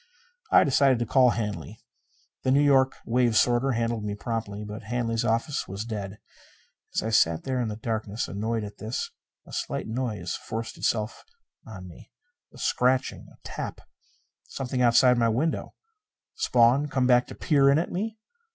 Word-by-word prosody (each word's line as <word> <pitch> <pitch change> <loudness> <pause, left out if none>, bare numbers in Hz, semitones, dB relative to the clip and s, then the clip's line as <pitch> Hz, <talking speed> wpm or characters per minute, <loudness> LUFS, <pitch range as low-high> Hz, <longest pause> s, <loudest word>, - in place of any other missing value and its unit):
I - - +7
decided 135 -2 +3
to 120 - -1
call 130 +2 +5
Hanley. 110 -1 -4 0.6
The - - -1
New 140 +2 +4
York 135 -2 +4
wave 120 -1 +2
sorter 125 +2 +3
handled 115 -1 -1
me 105 -1 -3
promptly, 105 -1 -4
but 105 +1 -7
Hanley's 115 0 -1
office 115 +6 -1
was 100 +3 -5
dead. 105 -3 -5 0.8
As - - +1
I 110 - -2
sat 85 -7 +3
there 130 -1 -1
in 120 - -1
the 105 - -4
darkness, 110 -1 -3
annoyed 110 +2 -2
at 105 0 -9
this, 110 +4 -4 0.3
a - - -14
slight - - -3
noise 115 -1 -3
forced 115 0 -5
itself 110 0 -2 0.4
on 95 -5 -9
me. 85 - -14 0.4
A - - -16
scratching 125 +1 0
a - - -19
tap - - -6 0.7
something 130 -1 -3
outside 125 +1 +5
my 115 -1 +3
window. 135 +9 -1 0.6
Spawn, 125 +4 +3
come 135 -3 0
back 125 -1 +4
to - - -9
peer 140 -4 +3
in 140 - +5
at 165 - -1
me? 220 +5 -3
115 Hz, 165 wpm, -26 LUFS, 110-130 Hz, 0.8 s, I